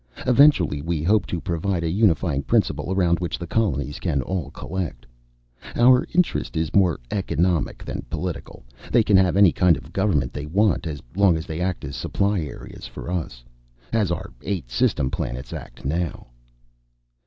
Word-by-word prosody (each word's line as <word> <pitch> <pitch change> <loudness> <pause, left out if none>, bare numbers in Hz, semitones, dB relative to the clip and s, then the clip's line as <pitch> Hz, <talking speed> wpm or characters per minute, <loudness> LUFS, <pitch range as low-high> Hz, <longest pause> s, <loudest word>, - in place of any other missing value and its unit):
Eventually 125 - +4
we 80 -1 -2
hope 105 +5 +2
to 90 - -3
provide 85 0 -2
a 80 - 0
unifying 85 -7 +2
principle 85 - 0
around 90 -3 +2
which 90 -1 -3
the 85 - -6
colonies 75 - -1
can 70 -7 -1
all 85 -2 -3
collect. 90 -6 -5 0.7
Our 125 +1 +5
interest 180 - +1
is 80 -1 -1
more 90 -6 +3
economic 90 -3 0
than - - -5
political. - - -5 0.3
They 120 -2 +5
can 105 - +3
have 95 -1 +3
any 100 -4 +7
kind 90 -3 +3
of 75 - -12
government 95 -11 +1
they 75 0 -5
want, 95 +1 +2
as 75 -3 -6
long 95 -4 +4
as 80 - -5
they 80 +1 -5
act 90 -4 -2
as 70 - -6
supply 100 0 0
areas 75 -5 -7
for - - -7
us. 80 -9 -4 0.5
As 110 -5 +2
our 85 -2 -4
eight 90 -12 -4
system 65 +2 +1
planets 65 0 -4
act - - -9
now." 80 -2 -2
85 Hz, 165 wpm, -23 LUFS, 75-100 Hz, 0.7 s, any